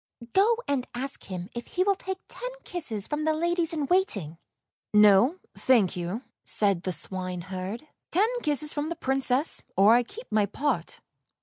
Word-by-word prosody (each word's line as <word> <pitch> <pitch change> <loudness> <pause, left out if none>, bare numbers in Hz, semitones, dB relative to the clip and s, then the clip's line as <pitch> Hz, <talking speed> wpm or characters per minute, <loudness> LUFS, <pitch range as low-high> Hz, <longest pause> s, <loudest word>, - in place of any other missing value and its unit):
" 235 0 -13
Go 435 +4 +4
and 275 -3 0
ask 270 +3 -4
him 180 -2 -5
if 235 0 -6
he 370 - 0
will 400 +1 +3
take 380 0 -5
ten - - -6
kisses 235 - -4
from 295 0 -2
the 315 0 +2
ladies 340 +1 +1
in 305 -3 -1
waiting." 205 - 0 0.3
" - - -66
No, 210 - +5 0.2
thank 225 -8 +3
you," 180 +7 -4 0.2
said 200 -4 +2
the 185 - -2
swineherd; 185 - -4
" - - -60
ten 395 +6 +4
kisses 300 - 0
from 295 +1 -2
the 340 - -3
Princess, 270 -1 0 0.2
or 200 +4 +7
I 240 - +6
keep 430 - -9
my 210 -1 +3
pot." 290 +8 -2
260 Hz, 180 wpm, -27 LUFS, 195-325 Hz, 0.3 s, or